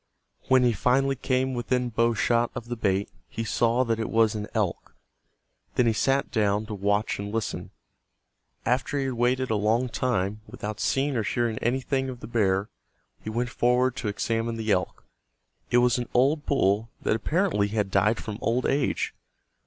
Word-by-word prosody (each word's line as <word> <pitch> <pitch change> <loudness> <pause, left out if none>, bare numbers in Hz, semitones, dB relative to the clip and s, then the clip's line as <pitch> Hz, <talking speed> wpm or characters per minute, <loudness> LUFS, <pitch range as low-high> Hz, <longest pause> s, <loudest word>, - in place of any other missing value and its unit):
When 130 -1 +5
he 120 -1 +3
finally 135 +6 +2
came 130 0 0
within 125 0 -1
bow 115 0 +1
shot 120 +2 +2
of 120 - -6
the 120 - -2
bait 100 -3 0 0.2
he 115 - -4
saw 120 +2 +2
that 115 -2 -1
it 110 - -2
was 110 -1 +3
an 105 -1 -4
elk. 105 -6 -2 0.8
Then 125 - +3
he 115 - +3
sat 135 +5 +1
down 105 -2 +1
to 110 - -6
watch 100 +1 0
and 100 0 -4
listen. 115 -1 -3 1.0
After 130 +4 0
he 140 - 0
had 130 - -1
waited 125 +1 +1
a - - +2
long 110 +4 +1
time 110 -4 -1
without 105 -2 -6
seeing 135 +4 +1
or 115 - +1
hearing 115 +1 -1
anything 130 +2 0
of 125 -2 -7
the - - -8
bear, 100 -4 +1 0.6
he - - -5
went 120 +3 -1
forward 125 +1 +2
to 115 - -3
examine 115 +3 -1
the 110 -1 -1
elk. 90 -1 -1 0.6
It 120 - +3
was 125 0 +3
an 120 - -4
old 145 +5 +2
bull 110 -4 +2
that - - +2
apparently 155 - +1
had 105 -2 -1
died 105 +4 +3
from 110 -2 -6
old 120 +2 0
age. 140 -1 0
115 Hz, 180 wpm, -26 LUFS, 105-125 Hz, 1.0 s, When